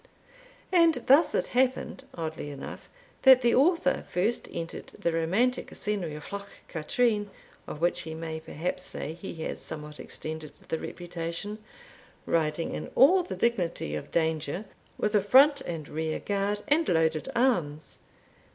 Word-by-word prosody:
And 335 -8 +4
thus 285 +6 +5
it - - +2
happened, 260 +1 0
oddly 160 -3 -4
enough, 140 -1 -8 0.3
that 260 -2 +8
the 235 - +4
Author 290 0 +3
first 205 +7 0
entered 165 0 -5
the 170 - 0
romantic 195 +11 +1
scenery 195 -7 -2
of 150 +5 -9
Loch 200 0 -5 0.2
Katrine, 205 +6 0 0.4
of 150 - -7
which 175 +1 +2
he 160 -1 -6
may 160 -1 -5
perhaps 160 +2 -4
say 155 - -4
he 175 +2 -8
has - - -4
somewhat 150 -1 -6
extended 155 -1 -6 0.2
the 160 - -1
reputation, 175 +4 -5 0.7
riding 165 0 0
in - - -5
all 365 +8 +7
the 360 - -5
dignity 180 - 0
of 75 - -5
danger, 160 +3 -1 0.3
with 210 - 0
a 210 - +5
front 275 +8 +6
and 160 -4 -4
rear 160 +1 -2
guard, 205 +1 -1
and 310 +3 +3
loaded 160 - +1
arms. 170 - 0
175 Hz, 145 wpm, -28 LUFS, 160-240 Hz, 0.7 s, that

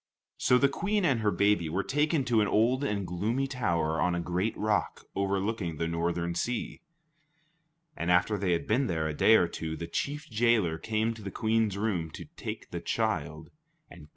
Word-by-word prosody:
So 125 - +4
the 140 - +4
Queen 200 +7 0
and 135 -8 +2
her 110 -1 +2
baby 100 -5 +2
were 95 +5 -1
taken 150 0 +1
to 115 -2 +3
an 105 - +2
old 120 +7 +2
and 105 -8 -1
gloomy 105 +10 -1
tower 85 -12 0
on 90 -1 +2
a - - -1
great 90 +5 -1
rock 105 0 -1
overlooking 100 -3 -1
the 85 - -1
northern 85 +1 -1
sea; 115 +8 -3 1.1
and 85 - -3
after 90 +4 +3
they 95 -3 0
had 85 - -1
been 125 +5 +1
there 80 -4 -1
a 80 - -2
day 110 +9 +5
or 90 - +4
two, 80 -1 -5
the 85 - -5
chief 145 - -3
jailer 110 -8 +2
came 110 +3 0
to 115 - -11
the 100 - -5
Queen's 110 -1 0
room 100 -6 -1
to - - -8
take - - -7
the - - -3
child 80 +1 -2 0.4
and 85 - -12
kill - - -13
him. - - -23
100 Hz, 200 wpm, -29 LUFS, 85-115 Hz, 1.1 s, day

